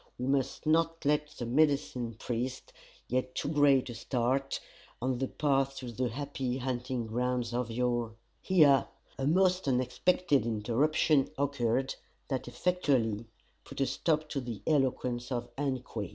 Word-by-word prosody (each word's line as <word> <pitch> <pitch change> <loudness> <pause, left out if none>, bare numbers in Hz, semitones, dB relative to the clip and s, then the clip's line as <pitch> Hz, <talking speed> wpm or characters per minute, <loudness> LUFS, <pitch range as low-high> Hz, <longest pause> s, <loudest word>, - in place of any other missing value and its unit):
We 125 - -3
must 135 +3 0
not 165 0 +2
let 150 +1 +2
the 125 - -7
medicine 130 -3 +1
priest 125 +3 -4 0.3
get 130 +1 -1
too - - -2
great 145 -3 +4
a 120 - -5
start 130 +3 -1 0.4
on 130 0 -1
the 135 - 0
path 135 -2 +1
to 125 -3 -6
the 125 +2 -1
happy 130 0 -3
hunting 125 -1 -2
grounds 125 +1 -1
of 120 -1 -1
your 120 -1 -1
" - - -42
Here, 150 -7 +5 0.3
a 135 - 0
most 185 +1 +3
unexpected 135 +3 +2
interruption 130 +6 +2
occurred, 135 -2 0 0.4
that 130 -3 -2
effectually 120 - 0 0.4
put - - -10
a 135 - +3
stop 155 +2 0
to 140 - -2
the 115 -5 -6
eloquence 130 -4 0
of 120 -1 -4
Ungque. 130 -7 -3
130 Hz, 145 wpm, -31 LUFS, 120-145 Hz, 0.4 s, Here